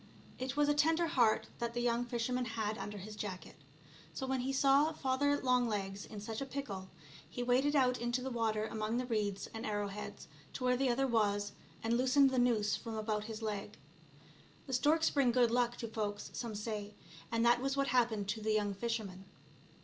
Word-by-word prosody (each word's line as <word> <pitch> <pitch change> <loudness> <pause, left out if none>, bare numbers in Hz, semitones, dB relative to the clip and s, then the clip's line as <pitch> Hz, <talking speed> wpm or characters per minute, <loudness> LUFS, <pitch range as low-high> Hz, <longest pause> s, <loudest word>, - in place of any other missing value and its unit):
It 260 +2 -3
was 295 0 +4
a 295 - +4
tender 320 +3 +3
heart 240 -9 +2
that 235 0 -3
the - - 0
young 240 0 +1
fisherman 245 +1 -1
had 220 -2 -2
under 205 +1 -5
his 210 +2 -8
jacket, 195 -5 -6 0.6
so 265 - -3
when 265 0 0
he 255 +2 -1
saw 275 +3 +4
Father 285 +1 +1
Longlegs 215 -6 0
in 215 - -8
such 220 +3 -5
a - - -1
pickle 205 -9 -5 0.4
he 245 - -4
waded 260 +4 +2
out 255 -2 +3
into 240 +1 0
the 265 - -3
water, 220 -2 0
among 220 +1 -2
the 250 - -1
reeds 210 -5 -1
and 225 0 -5
arrowheads 205 -1 -4 0.3
to 255 - -5
where 250 0 +3
the 265 +1 +1
other 255 +3 +2
was, 205 -4 +1 0.3
and 230 +1 +2
loosened 265 +1 +5
the 260 - +2
noose 220 -4 +2
from 230 -1 -6
about 215 -1 -2
his 220 0 -6
leg. 210 -1 -4 0.9
The 265 - -6
storks 310 +6 +3
bring 275 -4 +3
good 240 -1 +3
luck 240 0 +2
to 230 - -4
folks 210 -2 -4
some 235 -3 -4
people 205 - -5
say, 210 -2 -4 0.4
and 230 0 +2
that 240 +1 +5
was 270 +1 -1
what 275 0 +1
happened 230 -5 +2
to 220 - -2
the 215 0 +1
young 205 -1 +1
fisherman. 200 -3 -4
235 Hz, 200 wpm, -34 LUFS, 215-255 Hz, 0.9 s, loosened